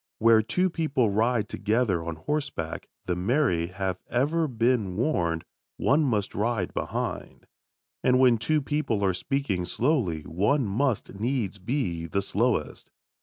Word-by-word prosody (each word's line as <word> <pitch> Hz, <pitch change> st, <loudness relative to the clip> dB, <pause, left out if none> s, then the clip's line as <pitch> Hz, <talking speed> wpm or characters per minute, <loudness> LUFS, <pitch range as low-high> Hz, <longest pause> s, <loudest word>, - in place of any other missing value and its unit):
Where 115 Hz, 0 st, +5 dB
two 180 Hz, +11 st, +1 dB
people 140 Hz, -10 st, +1 dB
ride 110 Hz, +1 st, +1 dB
together 105 Hz, -5 st, 0 dB
on 85 Hz, -1 st, -4 dB
horseback, 135 Hz, -, -3 dB, 0.2 s
the 90 Hz, -, 0 dB
married 90 Hz, -, +1 dB
have 95 Hz, -2 st, -2 dB
ever 150 Hz, +7 st, +1 dB
been 115 Hz, -6 st, +1 dB
warned, 85 Hz, -, 0 dB, 0.3 s
one 145 Hz, +4 st, +3 dB
must 110 Hz, -8 st, 0 dB
ride 105 Hz, -3 st, -1 dB
behind. -, -, -4 dB, 0.6 s
And 125 Hz, 0 st, +4 dB
when 125 Hz, -3 st, +5 dB
two 150 Hz, +6 st, +1 dB
people 135 Hz, -9 st, 0 dB
are 95 Hz, -, +2 dB
speaking 100 Hz, -2 st, -1 dB
slowly 110 Hz, -, 0 dB
one 110 Hz, -, +1 dB
must 110 Hz, -1 st, -1 dB
needs 110 Hz, -4 st, -1 dB
be 90 Hz, -, -2 dB
the 100 Hz, +4 st, -1 dB
slowest. -, -, -1 dB
110 Hz, 135 wpm, -27 LUFS, 95-135 Hz, 0.6 s, Where